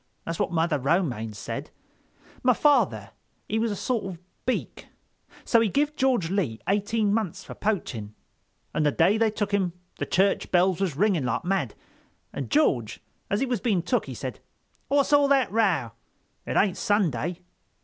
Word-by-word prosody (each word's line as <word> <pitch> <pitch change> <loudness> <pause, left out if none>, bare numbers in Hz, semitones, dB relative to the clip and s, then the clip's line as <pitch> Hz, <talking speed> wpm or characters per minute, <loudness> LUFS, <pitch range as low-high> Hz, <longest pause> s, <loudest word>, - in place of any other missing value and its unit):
That's 165 0 -4
what 205 - 0
Mother 165 -3 +1
Romaine 135 - 0
said—my 250 - -5
father 295 +3 +2 0.4
he 220 - 0
was 230 +1 +1
a 205 - -2
sort 230 0 -1
of 185 -3 -6 0.3
Beak, 255 - -2 0.6
so 230 - +4
he 225 - +2
give 295 +6 0
George 250 - +1
Lee 155 - -1
eighteen 205 +1 +1
months 215 -7 -2
for - - -9
poaching. 120 - -3 0.6
An' - - 0
the 150 -1 +3
day 190 +9 +3
they 225 -1 +4
took 210 -1 -2
him 190 -4 +1 0.3
the - - -2
church 195 +2 +2
bells 180 0 +3
was 180 -8 0
ringing 180 -4 +2
like 125 +6 -1
mad, 195 +1 -1 0.6
and - - -4
George, 125 - +1 0.3
as 205 +4 0
he - - +3
was 245 -6 -2
being 200 -8 +1
took, 245 +7 0
he - - -6
said: - - -6 0.5
'What's 285 +1 +2
all 285 -1 +6
that 270 -5 +3
row? 195 - +1 0.6
It - - -1
ain't 195 -2 +2
Sunday. 175 - 0
195 Hz, 170 wpm, -26 LUFS, 165-225 Hz, 0.6 s, all